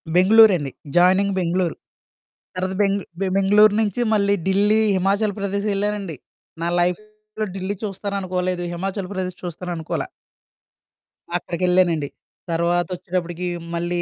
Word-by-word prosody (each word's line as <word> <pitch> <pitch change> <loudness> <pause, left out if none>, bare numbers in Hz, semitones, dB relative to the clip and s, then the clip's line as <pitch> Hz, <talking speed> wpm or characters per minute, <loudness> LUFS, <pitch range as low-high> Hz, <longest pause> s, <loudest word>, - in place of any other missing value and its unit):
బెంగుళూరండి. 185 - +6 0.3
Joining 190 +3 +4
Bengaluru. 175 -1 0 0.8
తర్వాత 185 +1 -2 0.5
బె 195 - +1
బెంగుళూరు 205 +2 +5
నుంచి 215 +1 -1
మళ్ళీ 200 -1 +3
ఢిల్లీ, 205 +3 +3 0.2
హిమాచల్ 200 +2 +1
ప్రదేశ్ 200 +1 -2
ఎళ్ళానండి. 200 -5 -2 0.5
నా 170 - 0
లైఫ్‌లో 215 +4 -3
ఢిల్లీ 190 +2 -3
చూస్తాననుకోలేదు, 185 -3 -2
హిమాచల్ 190 +2 -4
ప్రదేశ్ 185 -1 -4
చూస్తాను 180 +1 -5
అనుకోల. 160 - -3 1.4
అక్కడికెళ్ళానండి. 175 -4 +1 0.4
తర్వాత 170 +1 +1
వచ్చేటప్పటికి 180 0 -3 0.3
మళ్ళీ 175 +1 -1
185 Hz, 105 wpm, -22 LUFS, 175-200 Hz, 1.4 s, బెంగుళూరండి